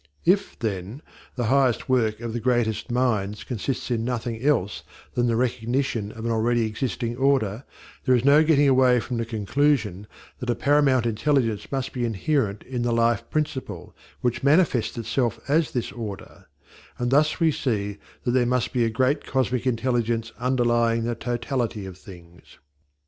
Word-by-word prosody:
If, 195 +3 +2
then, 105 - -4 0.3
the 125 - -1
highest 130 +1 +2
work 115 -4 +1
of 115 -1 -4
the 120 - -2
greatest 120 -2 0
minds 110 -5 0
consists 125 +2 -3
in 115 -2 0
nothing 120 -2 -3
else 125 -9 +1 0.3
than 120 0 +1
the 115 - +1
recognition 120 -2 -1
of 115 0 -8
an 115 - 0
already 115 +1 +1
existing 115 +1 -3
order, 130 -4 +1 0.4
there 130 - +4
is 125 +1 0
no 145 +2 +6
getting 145 -2 +4
away 130 -2 +5
from 120 +1 -4
the 115 -1 -2
conclusion 110 -3 0 0.3
that 125 - -5
a 120 - +2
paramount 140 -3 +3
intelligence 115 -2 0
must 135 -1 -2
be 125 - -2
inherent 115 -1 -1
in 125 -2 -4
the 120 0 0
Life 115 0 +1
Principle, 150 -4 -3 0.3
which 120 -1 0
manifests 140 -5 +2
itself 120 0 -1
as 155 +2 +2
this 120 - -3
order; 105 -5 -8 0.5
and 120 0 -1
thus 150 +5 +3
we 165 -2 +4
see 105 -8 -2 0.2
that 120 - 0
there 125 -1 +2
must 125 -1 0
be 120 - +2
a 115 - +2
great 130 +6 +1
cosmic 130 -1 -1
intelligence 115 -2 0
underlying 120 -2 +2
the 120 +1 -1
totality 120 -2 -3
of 95 -2 -8
things. 90 -3 -15
120 Hz, 165 wpm, -24 LUFS, 115-130 Hz, 0.5 s, no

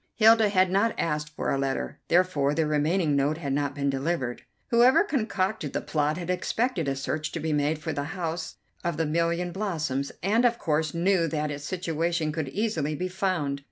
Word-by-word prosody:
Hilda 225 -1 +6
had 185 -2 +3
not 205 +4 +2
asked 150 -2 -1
for - - -1
a 135 - 0
letter, 135 -1 -2
therefore 165 -5 +2
the 160 0 +2
remaining 150 +1 +1
note 140 +3 +1
had 140 -5 -3
not 145 0 -1
been 140 -1 -1
delivered. 135 -3 -2 0.3
Whoever 245 +10 +6
concocted 215 - -1
the - - -1
plot 150 0 0
had 180 0 -3
expected 185 - -1
a 135 - 0
search 150 +3 -3
to 170 - -3
be 160 0 -1
made 150 +1 +1
for 155 +1 -4
the 145 0 -2
House 165 -1 -3 0.3
of 170 -3 -1
the 165 - +1
Million 170 +3 0
Blossoms, 155 -9 -2
and 215 +5 +3
of 240 -1 +3
course 155 -2 -1
knew 175 0 +2
that 150 -1 -2
its 145 0 -6
situation 170 -2 -1
could 155 -3 -3
easily 160 -5 -1
be 185 +5 -3
found. 180 -7 -1
165 Hz, 190 wpm, -27 LUFS, 150-185 Hz, 0.3 s, Hilda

